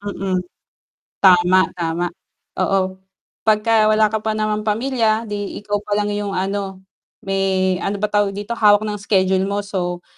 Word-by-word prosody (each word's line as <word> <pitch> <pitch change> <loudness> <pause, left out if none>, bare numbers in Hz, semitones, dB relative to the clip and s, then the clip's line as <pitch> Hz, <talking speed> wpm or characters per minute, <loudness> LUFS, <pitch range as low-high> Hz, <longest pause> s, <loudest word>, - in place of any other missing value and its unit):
Mm. 195 -2 -2 0.8
Tama, 180 -1 +6 0.2
tama 170 0 -1 0.5
oo, 190 -1 0 0.5
'pag 215 -1 +4
ka 230 - +2 0.2
wala 215 0 +4
ka 220 - +1
pa 220 0 -1
naman 215 0 -1
pamilya, 225 0 +1
'di 205 -2 -5
ikaw 205 0 -1
pa 205 - -2
lang 210 0 0
'yong, 205 -1 -3
ano 195 0 -3 0.4
may, 190 -1 0
ano, 200 - -2
ba 210 - 0
tawag 205 -1 +1
dito 205 +3 -6
hawak 210 -2 +4
ng 210 -1 -4
schedule 190 -1 +1
mo, 200 +1 -2
so, 180 -3 -3
200 Hz, 160 wpm, -20 LUFS, 190-210 Hz, 0.8 s, Tama